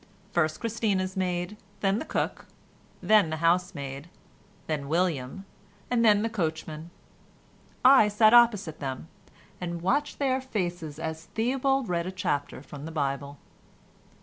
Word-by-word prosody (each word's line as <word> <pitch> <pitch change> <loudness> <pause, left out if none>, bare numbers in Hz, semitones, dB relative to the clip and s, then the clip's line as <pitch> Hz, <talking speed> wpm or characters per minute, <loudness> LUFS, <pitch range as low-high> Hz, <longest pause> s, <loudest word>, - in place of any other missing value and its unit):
First 155 -2 +1
Christina's 205 -4 -1
maid, 180 +1 -2 0.2
then 195 +1 +2
the - - -5
cook, - - -3 0.6
then 210 -6 +5
the 160 - -3
housemaid, 165 -4 -1 0.6
then 145 -3 -3
William, 165 0 -1 0.5
and 240 -1 +3
then 210 -2 +5
the - - +1
coachman. 160 -5 -3 1.0
I 260 -5 +8
sat 215 +2 +4
opposite 220 -9 +4
them, 135 +2 -5 0.5
and 170 -1 -4
watched 285 +11 0
their 265 -2 +1
faces 175 - -4
as 160 0 -5
Theobald 265 +2 +1
read 170 0 -1
a - - -3
chapter 145 -7 -2
from 145 +1 -9
the 165 - -6
Bible. 140 -2 -2
180 Hz, 130 wpm, -27 LUFS, 155-215 Hz, 1.0 s, I